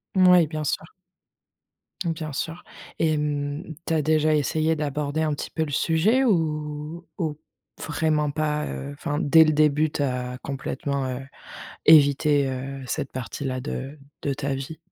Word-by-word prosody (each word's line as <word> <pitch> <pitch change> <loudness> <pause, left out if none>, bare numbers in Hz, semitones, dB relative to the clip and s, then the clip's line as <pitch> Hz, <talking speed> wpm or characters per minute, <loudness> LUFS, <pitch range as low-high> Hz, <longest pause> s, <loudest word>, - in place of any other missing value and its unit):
Moui, 180 -3 +6
bien 155 0 -4
sûr. 150 +2 -1 1.2
Bien 160 -2 -3
sûr. 165 +4 -4 0.4
Et 160 - +3
hem, 150 +1 -2
tu 165 - -1
as 155 - +2
déjà 155 +1 +3
essayé 155 +2 +1
d'aborder 150 +1 -2
un 155 -1 +1
petit 145 - -5
peu 160 -1 -1
le 145 - -7
sujet? 175 - +3
Ou 155 - -1
ou 155 -5 -2 0.4
vraiment 150 -1 0
pas? 150 0 -1
Heu, 140 - -5
enfin, 145 +1 -3
dès 160 +3 +6
le 155 - +3
début, 150 0 +3
tu 150 - -3
as 125 -2 -2
complètement, 140 0 -3
heu, 125 -1 -3 0.7
évité, 145 -2 +6
heu, 135 +1 -5
cette 140 +2 -3
partie-là 130 +2 -4
de 140 +1 -5 0.2
de 140 -1 -1
ta 140 0 -2
vie? 135 +4 -6
150 Hz, 155 wpm, -25 LUFS, 140-160 Hz, 1.2 s, Moui